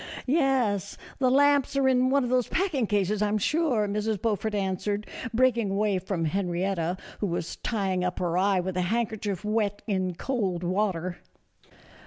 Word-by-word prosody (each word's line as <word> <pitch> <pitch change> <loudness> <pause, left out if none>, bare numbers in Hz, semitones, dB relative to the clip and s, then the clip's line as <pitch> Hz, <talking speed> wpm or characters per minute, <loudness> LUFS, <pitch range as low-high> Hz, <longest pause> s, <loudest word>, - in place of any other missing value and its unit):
" - - -21
Yes, 260 - +1 0.2
the 260 -2 +3
lamps 280 0 +3
are 270 -1 +3
in 255 0 +3
one 280 0 +3
of 245 - -2
those 250 -2 +2
packing 320 - 0
cases, 205 0 0
I 210 - +3
'm 210 +1 +1
sure," 250 - +1
Mrs. 210 +1 -1
Beaufort 215 0 -1
answered, 200 +1 -1 0.3
breaking 235 -3 +2
away 200 0 +1
from 180 -2 -2
Henrietta, 180 0 -1 0.2
who 205 - 0
was 170 -2 -3
tying 195 -5 -1
up 180 0 -2
her 175 -1 -1
eye 190 +1 +3
with 185 0 -4
a - - +2
handkerchief 215 -4 -2
wet 210 -1 0
in 185 -4 -1
cold 190 -6 -2
water. 185 -1 -1
205 Hz, 170 wpm, -27 LUFS, 185-240 Hz, 0.3 s, the